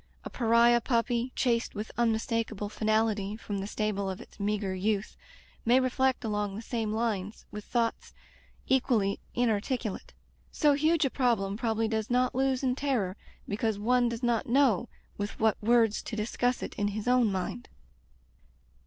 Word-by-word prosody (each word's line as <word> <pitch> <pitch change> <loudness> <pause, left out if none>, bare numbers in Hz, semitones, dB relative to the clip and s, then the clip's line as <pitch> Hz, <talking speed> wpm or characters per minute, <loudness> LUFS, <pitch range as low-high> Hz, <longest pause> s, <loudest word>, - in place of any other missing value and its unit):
A - - -6
pariah 235 0 +4
puppy, 235 +1 0
chased 235 -3 0
with 210 +1 -5
unmistakable 225 -2 0
finality 215 -1 0
from 205 -3 -4
the 195 - -4
stable 210 -2 -2
of 190 - -5
its - - -14
meagre 200 -1 -1
youth 200 +2 -1 0.5
may 245 +3 +5
reflect 260 -1 +1
along 205 -2 -1
the 220 - -6
same 225 -2 -2
lines, 215 -3 -2
with 210 0 -7
thoughts 235 -1 -1 0.6
equally 235 -7 +2 0.2
inarticulate. 230 -1 -1 0.4
So 295 -1 +3
huge 310 +2 +2
a 270 - 0
problem 225 -7 +1
probably 225 -1 0
does 220 -1 -2
not 250 +1 +2
lose 265 0 +1
in 255 -1 +2
terror 250 -9 -1 0.3
because 215 +1 -1
one 240 +3 +2
does 235 +1 -5
not 235 -2 +1
know 240 -4 +3 0.3
with 205 +1 -4
what 220 -2 +2
words 225 -1 +3
to 220 - -6
discuss 245 +3 -1
it - - -5
in 205 - +1
his 210 +2 -4
own 250 -4 +4
mind. 185 -9 -4
225 Hz, 155 wpm, -29 LUFS, 210-245 Hz, 0.6 s, may